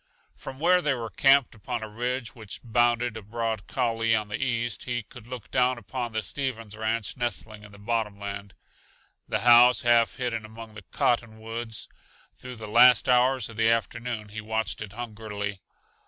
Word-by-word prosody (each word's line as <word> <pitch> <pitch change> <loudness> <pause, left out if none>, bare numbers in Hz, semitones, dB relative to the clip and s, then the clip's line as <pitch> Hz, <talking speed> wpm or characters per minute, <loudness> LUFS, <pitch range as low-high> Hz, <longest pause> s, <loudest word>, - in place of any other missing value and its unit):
From 135 - -9
where 180 +3 +4
they 150 -5 +1
were 115 -3 -5
camped 135 +2 +4
upon 115 +2 -5
a - - -5
ridge 120 +3 -3
which 110 -4 -8
bounded 120 0 +2
a 110 - -6
broad 110 0 -3
coulee 115 -3 +1
on 105 -1 -2
the 110 +6 -2
east, 120 -2 -1
he 120 -2 -2
could 115 +2 -14
look 120 -4 -8
down 125 0 +2
upon 120 +2 -5
the 110 -1 -2
Stevens 115 -6 -4
ranch 110 -1 -2
nestling 110 -3 -3
in 105 - -13
the 100 - -14
bottomland, 100 -2 -3 0.7
the - - -1
house 120 +1 +7
half 120 -1 +4
hidden 120 -4 -2
among 110 0 -11
the 105 - -10
cottonwoods. 115 -1 -2 0.5
Through 125 0 -9
the 110 -2 -8
last 125 +2 +6
hours 125 -1 +3
of 115 - -11
the 110 0 +3
afternoon 115 -1 -1
he 110 +1 -6
watched 110 -4 -2
it 105 -2 -7
hungrily. 105 -4 -5
115 Hz, 170 wpm, -27 LUFS, 110-120 Hz, 0.7 s, house